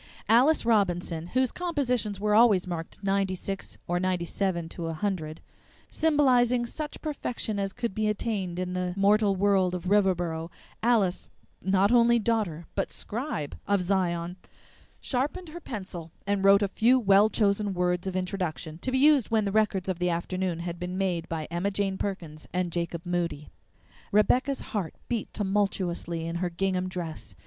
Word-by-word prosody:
Alice 250 Hz, +8 st, +4 dB
Robinson, 175 Hz, -7 st, +1 dB
whose 255 Hz, +5 st, +1 dB
compositions 250 Hz, -, -1 dB
were 210 Hz, +1 st, +1 dB
always 215 Hz, -4 st, +5 dB
marked 170 Hz, +2 st, -6 dB
96 195 Hz, 0 st, -2 dB
or 175 Hz, 0 st, 0 dB
97, 180 Hz, -1 st, -1 dB
100 165 Hz, -1 st, -3 dB, 0.5 s
symbolizing 250 Hz, -6 st, +3 dB
such 300 Hz, +5 st, -5 dB
perfection 245 Hz, -8 st, -3 dB
as 195 Hz, 0 st, -1 dB
could 235 Hz, -1 st, -3 dB
be 215 Hz, +1 st, 0 dB
attained 205 Hz, -4 st, -2 dB
in 180 Hz, 0 st, -2 dB
the 180 Hz, -1 st, -2 dB
mortal 200 Hz, 0 st, +4 dB
world 190 Hz, -2 st, +2 dB
of 180 Hz, -, -5 dB
Riverboro, 175 Hz, -5 st, +1 dB, 0.3 s
Alice, 215 Hz, -6 st, +2 dB, 0.3 s
not 195 Hz, +2 st, +3 dB
only 235 Hz, -1 st, +5 dB
Daughter, 210 Hz, -8 st, -1 dB
but -, -, -2 dB
Scribe 220 Hz, -, -4 dB
of 200 Hz, -2 st, +2 dB
Zion, 175 Hz, -2 st, -1 dB, 0.6 s
sharpened 295 Hz, +7 st, -2 dB
her 340 Hz, +3 st, -8 dB
pencil 185 Hz, -, -7 dB
and 200 Hz, -1 st, 0 dB
wrote 200 Hz, +1 st, +6 dB
a -, -, +2 dB
few 240 Hz, +6 st, +3 dB
well 200 Hz, -1 st, +5 dB
chosen 205 Hz, -1 st, +1 dB
words 180 Hz, +1 st, 0 dB
of 190 Hz, -, -3 dB
introduction, 180 Hz, -4 st, -3 dB
to 260 Hz, -, -3 dB
be 260 Hz, -, +2 dB
used 285 Hz, -3 st, +5 dB
when 220 Hz, -2 st, +2 dB
the 200 Hz, -, -1 dB
records 205 Hz, -3 st, +1 dB
of 185 Hz, -2 st, -2 dB
the 180 Hz, 0 st, +1 dB
afternoon 175 Hz, +1 st, -2 dB
had 170 Hz, 0 st, -5 dB
been 180 Hz, +1 st, -4 dB
made 180 Hz, -4 st, -1 dB
by 160 Hz, -2 st, -3 dB
Emma 175 Hz, +4 st, 0 dB
Jane 195 Hz, -1 st, -1 dB
Perkins 165 Hz, -6 st, -5 dB
and 180 Hz, -1 st, -1 dB
Jacob 170 Hz, 0 st, -3 dB
Moody. 170 Hz, -4 st, -2 dB, 0.6 s
Rebecca's 250 Hz, +6 st, +3 dB
heart 195 Hz, -7 st, -4 dB
beat 235 Hz, -4 st, -2 dB
tumultuously 190 Hz, -5 st, -1 dB
under 170 Hz, +1 st, -3 dB
her 180 Hz, -, 0 dB
gingham 185 Hz, +1 st, -1 dB
dress. 160 Hz, -, -6 dB
195 Hz, 155 wpm, -27 LUFS, 175-215 Hz, 0.6 s, wrote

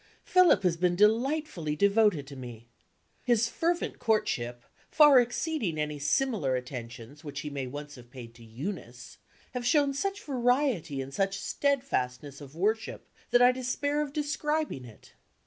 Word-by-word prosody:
Philip 365 Hz, -, +4 dB
has 175 Hz, -3 st, +1 dB
been 175 Hz, 0 st, +1 dB
delightfully 220 Hz, -, +1 dB
devoted 200 Hz, -4 st, +3 dB
to 140 Hz, 0 st, -10 dB
me. 120 Hz, -3 st, -10 dB, 0.6 s
His 235 Hz, -1 st, +2 dB
fervent 340 Hz, +7 st, -2 dB
courtship, 120 Hz, -, -1 dB, 0.3 s
far 295 Hz, -4 st, +7 dB
exceeding 245 Hz, -, -1 dB
any 150 Hz, -1 st, -2 dB
similar 145 Hz, -, +1 dB
attentions 125 Hz, +2 st, -7 dB
which 145 Hz, -2 st, -6 dB
he 150 Hz, -, -6 dB
may 135 Hz, -2 st, -4 dB
once 145 Hz, +3 st, -8 dB
have 120 Hz, -3 st, -14 dB
paid 120 Hz, -2 st, -11 dB
to 115 Hz, 0 st, -16 dB
Eunice, 125 Hz, -, -7 dB, 0.3 s
has 245 Hz, -1 st, -3 dB
shown 285 Hz, -2 st, +3 dB
such 395 Hz, +8 st, -3 dB
variety 245 Hz, -, 0 dB
and 135 Hz, +1 st, -11 dB
such 195 Hz, +2 st, 0 dB
steadfastness 145 Hz, -, -2 dB
of 140 Hz, +1 st, -12 dB
worship, 215 Hz, +6 st, -2 dB, 0.2 s
that 245 Hz, 0 st, +5 dB
I 250 Hz, -, +7 dB
despair 275 Hz, +4 st, -1 dB
of 295 Hz, -2 st, -3 dB
describing 300 Hz, -, -2 dB
it. 110 Hz, -3 st, -16 dB
195 Hz, 145 wpm, -29 LUFS, -, 0.6 s, far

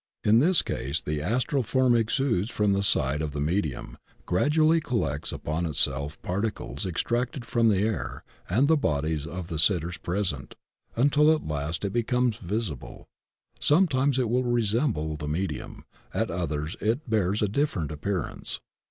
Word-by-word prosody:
In 110 Hz, +2 st, +5 dB
this 175 Hz, +7 st, +4 dB
case 70 Hz, +4 st, -2 dB
the 75 Hz, -2 st, -3 dB
astral 125 Hz, -, 0 dB
form 130 Hz, +1 st, +2 dB
exudes 115 Hz, -2 st, +1 dB
from 105 Hz, -3 st, +1 dB
the 100 Hz, -, +1 dB
side 75 Hz, -6 st, +3 dB
of 75 Hz, -2 st, -3 dB
the 75 Hz, -, -3 dB
medium, 75 Hz, -2 st, -2 dB, 0.3 s
gradually 155 Hz, -, +3 dB
collects 80 Hz, -, -2 dB
upon 80 Hz, +3 st, -2 dB
itself 70 Hz, -1 st, -1 dB
particles 95 Hz, -, -3 dB
extracted 120 Hz, -, -2 dB
from 115 Hz, -1 st, +2 dB
Sie 100 Hz, -2 st, +2 dB
air 100 Hz, -, -3 dB, 0.3 s
and 120 Hz, +10 st, +3 dB
the 160 Hz, -, +5 dB
bodies 75 Hz, -, -1 dB
of 90 Hz, +1 st, -5 dB
the 80 Hz, -2 st, -4 dB
sitters 85 Hz, 0 st, +2 dB
present 85 Hz, -7 st, -3 dB, 0.4 s
until 145 Hz, +5 st, +4 dB
at 155 Hz, -, 0 dB
last 75 Hz, +5 st, -2 dB
it 100 Hz, -, -2 dB
becomes 120 Hz, -1 st, +1 dB
visible. 95 Hz, -, -4 dB, 0.5 s
Sometimes 145 Hz, -5 st, +3 dB
it 125 Hz, -2 st, +1 dB
will 125 Hz, +3 st, +1 dB
resemble 115 Hz, -, 0 dB
the 75 Hz, -1 st, -5 dB
medium; 75 Hz, -1 st, -4 dB, 0.3 s
at -, -, 0 dB
others 80 Hz, -2 st, -3 dB
it 120 Hz, +8 st, 0 dB
bears 105 Hz, -2 st, +1 dB
a -, -, +3 dB
different 100 Hz, -, -1 dB
appearance. 85 Hz, +3 st, -4 dB
100 Hz, 150 wpm, -27 LUFS, 80-120 Hz, 0.5 s, In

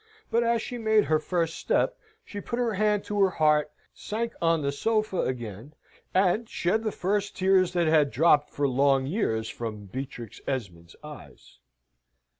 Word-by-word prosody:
But, 235 Hz, -, +3 dB
as 235 Hz, -1 st, +1 dB
she 245 Hz, -, -6 dB
made 220 Hz, -1 st, +3 dB
her 155 Hz, 0 st, +2 dB
first 165 Hz, +1 st, -2 dB
step, -, -, +1 dB, 0.3 s
she 205 Hz, -, -7 dB
put 235 Hz, -, -4 dB
her 240 Hz, -3 st, 0 dB
hand 210 Hz, 0 st, +1 dB
to 205 Hz, -1 st, -1 dB
her 195 Hz, -, +5 dB
heart, 150 Hz, -3 st, +2 dB, 0.2 s
sank 230 Hz, +2 st, -4 dB
on 165 Hz, -2 st, +2 dB
the 140 Hz, -, 0 dB
sofa 215 Hz, +5 st, 0 dB
again, 120 Hz, +2 st, -5 dB, 0.4 s
an 195 Hz, +4 st, +2 dB
shed 215 Hz, +5 st, 0 dB
the 215 Hz, -, -1 dB
first 200 Hz, +2 st, -1 dB
tears 185 Hz, -1 st, +3 dB
that 175 Hz, -1 st, +2 dB
had 155 Hz, -2 st, +4 dB
dropped 150 Hz, +1 st, +3 dB
for 145 Hz, 0 st, -1 dB
long 135 Hz, 0 st, +2 dB
years 120 Hz, -, -1 dB
from 110 Hz, -3 st, -6 dB
Beatrix 125 Hz, 0 st, -7 dB
Esmond's 90 Hz, -10 st, -5 dB
eyes. 145 Hz, -, -13 dB
165 Hz, 165 wpm, -27 LUFS, 135-210 Hz, 0.4 s, her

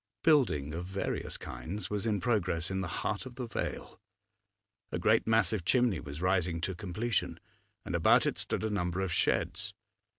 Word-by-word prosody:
Building 110 Hz, -, +3 dB
of 85 Hz, +2 st, -4 dB
various 95 Hz, +1 st, -3 dB
kinds 85 Hz, -, -6 dB
was 105 Hz, +2 st, -1 dB
in 105 Hz, -2 st, +1 dB
progress 90 Hz, -5 st, 0 dB
in 95 Hz, 0 st, -1 dB
the 95 Hz, -, -2 dB
heart 85 Hz, -, -2 dB
of 125 Hz, -, -11 dB
the 125 Hz, -1 st, -4 dB
vale; 115 Hz, -, -4 dB, 0.9 s
a -, -, -1 dB
great 110 Hz, +7 st, +3 dB
massive 110 Hz, -3 st, +3 dB
chimney 120 Hz, -, +3 dB
was 70 Hz, +4 st, -7 dB
rising 90 Hz, -2 st, +2 dB
to 95 Hz, -, -1 dB
completion, 100 Hz, +5 st, -2 dB, 0.5 s
and -, -, -4 dB
about -, -, +5 dB
it -, -, -1 dB
stood -, -, -1 dB
a 110 Hz, -, 0 dB
number 90 Hz, -2 st, -1 dB
of 95 Hz, -3 st, -1 dB
sheds. -, -, 0 dB
95 Hz, 170 wpm, -31 LUFS, 85-110 Hz, 0.9 s, about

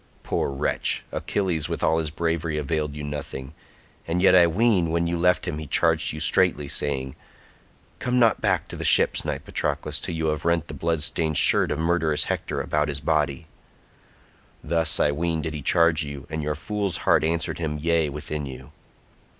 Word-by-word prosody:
Poor -, -, -1 dB
wretch, 70 Hz, -1 st, -1 dB
Achilles 90 Hz, -7 st, -2 dB
with -, -, -4 dB
all 80 Hz, -, +2 dB
his 80 Hz, -2 st, -2 dB
bravery 80 Hz, 0 st, -2 dB
availed 75 Hz, 0 st, -2 dB
you 75 Hz, -, -6 dB
nothing; 70 Hz, -1 st, -6 dB, 0.5 s
and 85 Hz, +2 st, -1 dB
yet 95 Hz, -, +5 dB
I 90 Hz, -2 st, +7 dB
ween 95 Hz, -1 st, +2 dB
when 85 Hz, +1 st, 0 dB
you 85 Hz, +1 st, -1 dB
left 90 Hz, +1 st, +1 dB
him 75 Hz, -, -3 dB
he 80 Hz, -, -7 dB
charged -, -, +2 dB
you 75 Hz, -, -6 dB
straitly 80 Hz, -2 st, +3 dB
saying, 65 Hz, -2 st, -3 dB, 0.8 s
'Come 125 Hz, 0 st, -1 dB
not 115 Hz, -3 st, +3 dB
back -, -, +1 dB
to -, -, -7 dB
the -, -, -6 dB
ships, -, -, +4 dB
knight 75 Hz, -2 st, -4 dB
Patroclus, -, -, -2 dB
till 85 Hz, -, -4 dB
you 80 Hz, -1 st, -1 dB
have 75 Hz, 0 st, -3 dB
rent 85 Hz, -1 st, 0 dB
the -, -, -6 dB
blood 80 Hz, -2 st, -1 dB
stained 80 Hz, -2 st, 0 dB
shirt -, -, +5 dB
of -, -, -2 dB
murderous 80 Hz, -2 st, +1 dB
Hector -, -, -3 dB
about 75 Hz, 0 st, 0 dB
his 75 Hz, 0 st, -3 dB
body.' 75 Hz, +1 st, -1 dB, 1.2 s
Thus 80 Hz, 0 st, +1 dB
I 75 Hz, -, +3 dB
ween 80 Hz, +1 st, -2 dB
did 80 Hz, -, -4 dB
he 75 Hz, -, -5 dB
charge 85 Hz, +2 st, +3 dB
you, 70 Hz, -2 st, -8 dB
and 80 Hz, 0 st, -3 dB
your 75 Hz, 0 st, -2 dB
fool's 100 Hz, +2 st, -2 dB
heart -, -, +4 dB
answered 80 Hz, +1 st, -1 dB
him 75 Hz, -2 st, -3 dB
'yea' 80 Hz, 0 st, +1 dB
within 75 Hz, 0 st, -5 dB
you." 65 Hz, +2 st, -10 dB
80 Hz, 190 wpm, -24 LUFS, 75-85 Hz, 1.2 s, I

